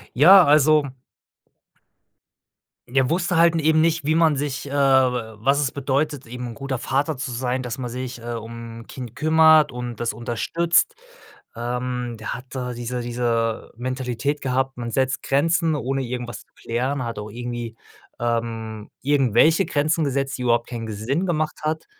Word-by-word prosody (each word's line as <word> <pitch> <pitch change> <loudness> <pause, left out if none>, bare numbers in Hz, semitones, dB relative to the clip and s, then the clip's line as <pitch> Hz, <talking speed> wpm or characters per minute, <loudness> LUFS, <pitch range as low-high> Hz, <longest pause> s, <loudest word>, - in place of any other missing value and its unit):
Ja, 180 +7 +8
also 150 0 +5 2.0
er 130 +1 +1
wusste 175 +1 0
halt 170 0 +5
n - - +1
eben 155 +1 +3
nicht, 165 -2 +1
wie 155 - +2
man 160 -2 +4
sich, 140 0 -3
äh - - -9
wa 130 -5 +2
was 140 +5 +2
es 140 -3 0
bedeutet, 140 -1 -1
eben 125 +1 -6
'n - - -7
guter 135 -1 -4
Vater 140 +4 -1
zu 130 -1 -4
sein, 125 +1 -2
dass 125 +1 -5
man 125 - -4
sich, 125 0 -5
äh, 120 0 -5
um 115 0 -8
'n - - -16
Kind 125 -4 -8
kümmert 155 -1 +5
und 120 -1 -5
das 115 -2 -1
unterstützt. 165 - +1 0.6
Ähm, 125 0 -3
der 110 - -4
hat 125 - -9
da 125 -2 -4
diese 120 +1 -4
diese 120 -1 -1
Mentalität 130 +3 -2
gehabt, 135 0 -1
man 120 -1 -4
setzt 130 +1 0
Grenzen 165 +3 +2
ohne 135 -1 -1
irgendwas 120 -3 -5
zu - - -26
klären, 130 +3 -2
hat 115 -2 -5
auch 105 0 -6
irgendwie, 120 -1 -5 0.4
ähm, 115 -2 -3
irgendwelche 145 - +3
Grenzen 155 +2 +1
gesetzt, 135 0 -1
die 125 - -5
überhaupt 120 -1 +2
keinen 115 -2 -5
ge 110 - -5
Sinn 135 - -1
gemacht 155 -3 -1
hat, 155 +1 -2
130 Hz, 170 wpm, -23 LUFS, 120-145 Hz, 2.0 s, Ja